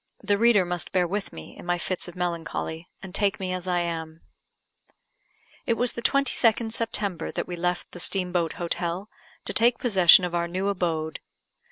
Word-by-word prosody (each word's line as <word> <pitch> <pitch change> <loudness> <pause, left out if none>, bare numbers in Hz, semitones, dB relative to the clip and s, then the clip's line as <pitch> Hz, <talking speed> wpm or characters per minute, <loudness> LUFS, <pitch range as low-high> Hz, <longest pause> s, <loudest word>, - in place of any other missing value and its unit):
The 205 0 +1
reader 230 -5 +5
must 175 -1 -1
bear 180 -2 +2
with 200 +3 -3
me 80 -1 -11
in - - -11
my 175 0 0
fits 185 +1 -3
of 175 - -10
melancholy, 170 -1 -3 0.2
and 190 -1 -9
take 200 -1 +1
me 185 -1 -3
as 185 0 -3
I 175 -1 +1
am. 165 -1 -5 1.5
It 230 - +2
was 245 +1 0
the 235 - -5
22nd 235 -4 +3
September 215 -5 -1
that - - -4
we 180 - -4
left 180 +1 -2
the 180 - -10
Steam 180 0 0
boat 170 -3 0
Hotel, 175 +3 -3 0.4
to - - -1
take 235 +2 +4
possession 190 -6 +6
of 175 - -5
our 170 0 0
new 185 +3 -1
abode. 165 -5 -2
180 Hz, 185 wpm, -26 LUFS, 170-205 Hz, 1.5 s, possession